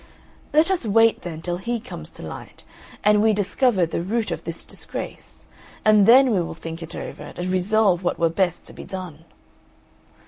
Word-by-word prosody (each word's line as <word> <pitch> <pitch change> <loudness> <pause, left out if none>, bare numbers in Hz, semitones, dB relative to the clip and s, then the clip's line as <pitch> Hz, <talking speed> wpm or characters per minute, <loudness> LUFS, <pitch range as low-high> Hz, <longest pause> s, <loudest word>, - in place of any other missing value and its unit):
Let 315 +5 +4
us 370 -6 0
wait, 225 +1 +3
then, 165 -2 -7
till 175 0 -2
he 235 +5 -2
comes 240 - -9
to - - -12
light, - - -9 0.4
and 210 0 +5
we 220 0 +4
discover 205 0 +2
the 165 - -3
root 215 +5 -1
of - - -5
this - - -5
disgrace, - - -8 0.4
and 215 -2 +6
then 255 +2 +7
we 190 - +2
will 165 - -5
think 165 0 -7
it 165 - -7
over - - -7
and 175 - -3
resolve 185 0 +2
what 175 - 0
were 170 - +3
best 175 +1 -1
to - - -12
be - - -9
done." 175 -4 -8
195 Hz, 185 wpm, -23 LUFS, 175-225 Hz, 0.4 s, then